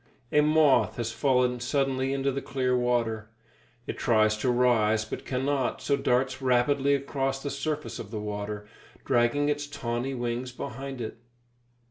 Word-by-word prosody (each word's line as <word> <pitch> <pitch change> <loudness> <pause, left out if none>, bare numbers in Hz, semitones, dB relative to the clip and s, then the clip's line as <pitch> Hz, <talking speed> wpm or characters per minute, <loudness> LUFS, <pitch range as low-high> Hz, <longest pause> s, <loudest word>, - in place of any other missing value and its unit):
A 150 - +5
moth 150 -2 +4
has 115 -1 -2
fallen 125 0 +2
suddenly 135 +1 0
into 135 0 0
the 135 +1 -3
clear 130 -2 0
water. 115 -3 0 0.6
It - - -5
tries 110 -2 +3
to 125 - 0
rise, 115 -3 +3
but - - -6
cannot, 135 0 0
so 140 - +1
darts 130 0 0
rapidly 135 +2 +3
across 135 -1 -2
the 140 - -3
surface 150 +2 -3
of - - -7
the 110 -1 -4
water, 105 0 -4 0.4
dragging 130 +4 +2
its 145 0 -1
tawny 125 -1 -3
wings 120 +1 -3
behind 135 +1 -6
it. 110 0 -6
130 Hz, 150 wpm, -27 LUFS, 120-140 Hz, 0.6 s, A